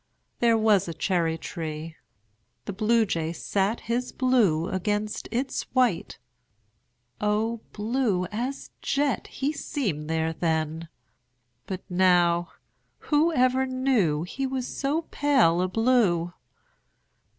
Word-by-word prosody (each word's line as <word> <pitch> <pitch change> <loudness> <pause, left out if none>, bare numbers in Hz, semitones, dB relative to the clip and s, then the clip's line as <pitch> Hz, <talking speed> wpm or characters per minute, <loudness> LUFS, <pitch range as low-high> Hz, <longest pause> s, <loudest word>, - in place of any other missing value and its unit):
There 230 -1 +4
was 215 -4 +3
a 165 - -5
cherry 170 -4 0
tree. 160 0 -6 0.7
The - - -4
Bluejay 210 -6 +1
sat 200 +5 -1
His 245 +2 -2
blue 220 -11 +2
against 210 +2 -2
its 260 +4 -1
white 250 -9 +1 1.0
O 215 +2 0
blue 215 -4 0
as 250 +6 -4
jet 280 -1 0
He 280 +3 -2
seemed 195 - -3
there 160 0 0
then! 160 0 -2 0.8
But 190 -1 -5
now 175 -2 +3 0.6
Whoever 265 -4 +3
knew 250 - +1
He 265 +10 -3
was 260 -1 -3
so 290 +4 -1
pale 255 - +3
a 185 - +1
blue! 190 -6 +2
210 Hz, 105 wpm, -26 LUFS, 170-255 Hz, 1.0 s, There